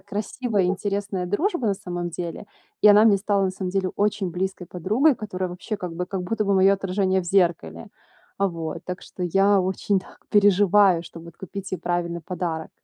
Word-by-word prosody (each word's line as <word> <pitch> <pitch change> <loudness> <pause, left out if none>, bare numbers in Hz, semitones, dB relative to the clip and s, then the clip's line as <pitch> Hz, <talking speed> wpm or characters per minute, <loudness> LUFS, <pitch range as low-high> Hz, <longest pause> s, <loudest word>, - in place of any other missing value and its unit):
красивая 210 +1 -2
интересная 195 0 -2
дружба, 275 - 0
на 200 - +1
самом 175 -3 -5
деле. 170 +4 -6 0.4
И 210 - +8
она 210 +1 +7
мне 205 -3 +6
стала, 200 -1 +1
на 190 - 0
самом 185 -1 -4
деле, 190 -1 -1
очень 200 -3 0
близкой 185 0 -4
подругой, 215 - +2
которая 185 -4 -4
вообще 180 +5 -5
как 180 -4 -6
бы 180 +2 -4
как 190 -1 -4
будто 215 +4 -1
бы 200 0 +2
моё 190 +1 +5
отражение 190 0 0
в - - -7
зеркале. 170 - 0 0.5
Э, 200 - +4
вот, 165 -1 -5
так 180 0 -6
что 185 - -8
я 195 +3 +3
очень 190 +1 0
так - - -18
переживаю, 200 -3 +4
чтоб 165 - -11
вот 170 -1 -13
купить 195 +1 -7
ей 185 - -1
правильный 175 -1 -2
подарок. 165 -1 -4
190 Hz, 190 wpm, -24 LUFS, 175-205 Hz, 0.5 s, И